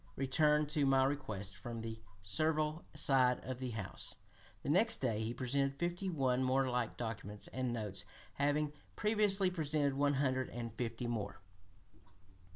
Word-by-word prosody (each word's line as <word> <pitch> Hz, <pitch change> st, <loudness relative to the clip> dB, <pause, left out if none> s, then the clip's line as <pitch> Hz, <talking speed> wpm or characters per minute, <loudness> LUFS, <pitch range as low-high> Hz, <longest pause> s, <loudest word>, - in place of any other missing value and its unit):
returned 150 Hz, +3 st, +3 dB
to 150 Hz, 0 st, +1 dB
my 135 Hz, -1 st, +5 dB
request 110 Hz, -9 st, -2 dB
from 115 Hz, +4 st, -6 dB
the 110 Hz, 0 st, -6 dB, 0.2 s
servile 155 Hz, -, 0 dB
side 130 Hz, -3 st, +4 dB
of 130 Hz, -1 st, -4 dB
the 130 Hz, -1 st, -3 dB
House." 105 Hz, -5 st, -5 dB, 0.5 s
The -, -, -3 dB
next 220 Hz, +8 st, +4 dB
day 115 Hz, -5 st, 0 dB
he 110 Hz, +1 st, -1 dB
presented 135 Hz, +3 st, 0 dB
fifty 175 Hz, +4 st, -1 dB
one 130 Hz, -6 st, +1 dB
more 130 Hz, +1 st, +3 dB
like 125 Hz, -2 st, -1 dB
documents, 105 Hz, -3 st, -5 dB
and 130 Hz, -1 st, -2 dB
notes 105 Hz, -4 st, -2 dB, 0.3 s
having 145 Hz, +1 st, +1 dB, 0.2 s
previously 205 Hz, -3 st, +3 dB
presented 150 Hz, -4 st, +1 dB
one 145 Hz, +1 st, +2 dB
hundred 130 Hz, -2 st, +1 dB
and 115 Hz, -2 st, -5 dB
fifty 115 Hz, 0 st, -3 dB
more. 105 Hz, -4 st, -3 dB
130 Hz, 150 wpm, -36 LUFS, 115-150 Hz, 0.5 s, my